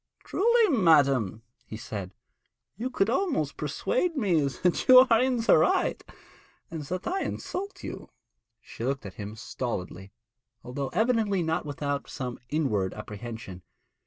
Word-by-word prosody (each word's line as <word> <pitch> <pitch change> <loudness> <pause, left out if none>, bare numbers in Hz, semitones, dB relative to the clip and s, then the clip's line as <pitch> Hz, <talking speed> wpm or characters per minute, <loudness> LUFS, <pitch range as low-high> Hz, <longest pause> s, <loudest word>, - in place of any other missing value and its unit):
'Truly, 450 - +3
madam,' 140 - +3 0.2
he 110 - -8
said, 100 -4 -6 0.6
'you 235 +6 -3
could 205 -6 +1
almost 350 - 0
persuade 360 -10 -1
me 185 - +2
that 165 +7 -1
you 255 0 +10
are 225 0 +6
in 255 -1 +2
the 225 - +5
right, - - +1 0.7
and 165 -2 -5
that 180 +5 -4
I 380 +2 -1
insult 395 +2 -5
you.' - - -7 0.5
She 115 - -10
looked 135 -2 -2
at 95 - -7
him 105 +1 -6
stolidly, 100 -5 -5 0.5
although 135 +2 -4
evidently 215 -2 +1
not 160 -1 -1
without 145 0 -3
some 125 -2 -5
inward 115 -12 0
apprehension. 105 -3 -8
150 Hz, 135 wpm, -27 LUFS, -, 0.7 s, you